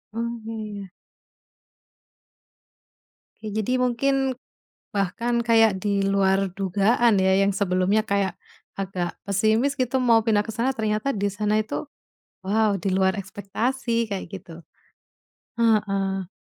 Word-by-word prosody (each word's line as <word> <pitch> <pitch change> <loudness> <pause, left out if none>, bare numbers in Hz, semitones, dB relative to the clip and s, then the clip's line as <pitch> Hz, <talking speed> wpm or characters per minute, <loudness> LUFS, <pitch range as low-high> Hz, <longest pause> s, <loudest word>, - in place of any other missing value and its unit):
Oh, 235 +1 -3
iya. 215 -3 -6 2.5
Ya, 215 - -5
jadi 250 +4 0
mungkin 265 +1 +1 0.6
bahkan 230 +5 0
kayak 225 -4 +4
di 200 -1 0
luar 195 -1 +2
dugaan 200 +4 +2
ya, 190 0 +3
yang 195 0 +2
sebelumnya 190 +2 +2
kayak 200 -2 0 0.5
agak 180 -3 -3
pesimis 220 +7 +2
gitu 255 0 0
mau 230 -3 +4
pindah 210 -2 +3
ke 225 - -5
sana, 240 +3 0
ternyata 215 +2 -1
di 205 -1 -1
sana 210 +1 0
itu, 215 - -4 0.6
wow, 210 +1 +2
di 195 - -2
luar 190 0 +2
ekspektasi 230 +5 -2
kayak 195 - -3
gitu. 180 -3 -9 1.0
Heeh. 195 -4 +1
210 Hz, 115 wpm, -24 LUFS, 195-230 Hz, 2.5 s, kayak